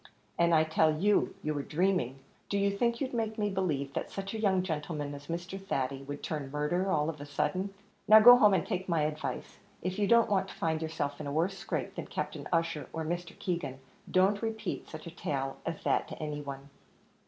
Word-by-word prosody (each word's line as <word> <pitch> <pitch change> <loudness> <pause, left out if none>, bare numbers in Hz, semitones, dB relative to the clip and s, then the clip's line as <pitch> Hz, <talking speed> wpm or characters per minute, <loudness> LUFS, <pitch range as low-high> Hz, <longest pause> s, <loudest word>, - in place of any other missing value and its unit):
"And 170 -1 +4
I 155 - +5
tell 155 -1 +2
you, 205 +3 +2
you 155 - 0
were 145 - -2
dreaming. 150 -5 0 0.3
Do 200 - 0
you 200 0 +2
think 235 +2 +1
you'd 260 -2 -2
make 220 -2 -1
me 210 -1 0
believe 150 -8 -1
that - - -3
such 195 +1 -5
a 220 - -3
young 190 -4 +2
gentleman 150 -3 -3
as 145 0 -9
Mr. 175 +3 -5
Thady 135 -6 -2
would 145 +1 -7
turn 150 -4 -3
murderer 150 +7 0
all 150 -4 +2
of 155 -3 -4
a - - -6
sudden? 185 +7 -1 0.4
Now 215 +1 +10
go 245 +3 +11
home, 210 -5 +6
and - - 0
take 185 0 -3
my 165 -3 +2
advice; 155 0 -4 0.2
if 185 +2 -2
you 205 - +2
don't 235 +2 +5
want 195 -3 +1
to - - -10
find 160 -1 -1
yourself 155 -3 -3
in 145 - -5
a - - -3
worse 170 +6 +1
scrape - - -3
than - - -6
Captain - - -4
Ussher, 165 -4 0
or 160 -1 -3
Mr. 175 +1 -4
Keegan, 170 -7 -3 0.3
don't 195 +2 +3
repeat 220 -3 -3
such 155 -1 -8
a 170 - -7
tale 135 -4 -3
as - - -4
that - - +1
to - - -8
any 150 -1 -3
one." 140 0 -8
170 Hz, 220 wpm, -31 LUFS, 150-195 Hz, 0.4 s, go